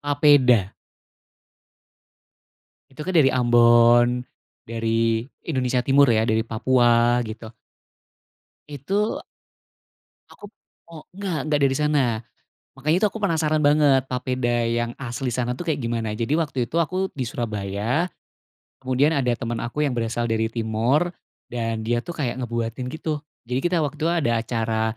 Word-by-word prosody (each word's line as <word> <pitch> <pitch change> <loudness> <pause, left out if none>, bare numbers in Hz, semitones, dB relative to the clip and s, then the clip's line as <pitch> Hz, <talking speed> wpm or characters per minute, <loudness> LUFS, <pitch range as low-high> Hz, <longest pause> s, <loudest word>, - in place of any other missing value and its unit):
papeda. 140 -8 +4 2.2
Itu 135 - -13
kan 185 - -1
dari 145 -4 +6
Ambon, 120 0 +5 0.6
dari 115 -1 -3 0.6
Indonesia 125 -4 0
Timur 140 0 +5
ya, 110 -1 +3
dari 110 0 +2
Papua 120 +1 +2
gitu. 110 0 -8 1.2
Itu. 190 - -2 1.1
Aku - - -16
p - - -59 0.3
mo 165 -2 -11
enggak, 195 -5 -3
enggak 150 -1 +1
dari 135 -1 +2
sana, 150 0 +2 0.8
makanya 155 +3 +1
itu 210 - +4
aku 225 - -8
penasaran 160 -5 +1
banget 145 -3 +4
papeda 125 -2 -1
yang 120 0 -1
asli 125 0 -3
sana 125 0 -1
tuh, 175 - -6
kayak 155 -5 -1
gimana. 115 -2 -2
Jadi 115 +6 -2
waktu 135 -6 -1
itu, 165 - -2
aku 185 +4 -1
di 130 - -2
Surabaya, 110 - -2 0.7
kemudian 135 +3 +1
ada 130 -5 +1
teman 120 -2 -4
aku 135 +6 -2
yang 140 - 0
berasal 115 0 -2
dari 110 0 +1
Timor, 115 +9 0 0.4
dan 115 -2 -3
dia 120 +1 0
tuh 170 +7 -8
kayak 130 -4 -3
ngebuatin 120 0 -3
gitu. 155 +1 -4 0.2
Jadi 125 +2 -2
kita 175 -2 +1
waktu 150 +1 -4
itu 160 - 0
ada 155 -9 +1
acara 115 -1 -1
125 Hz, 140 wpm, -23 LUFS, 115-150 Hz, 2.2 s, dari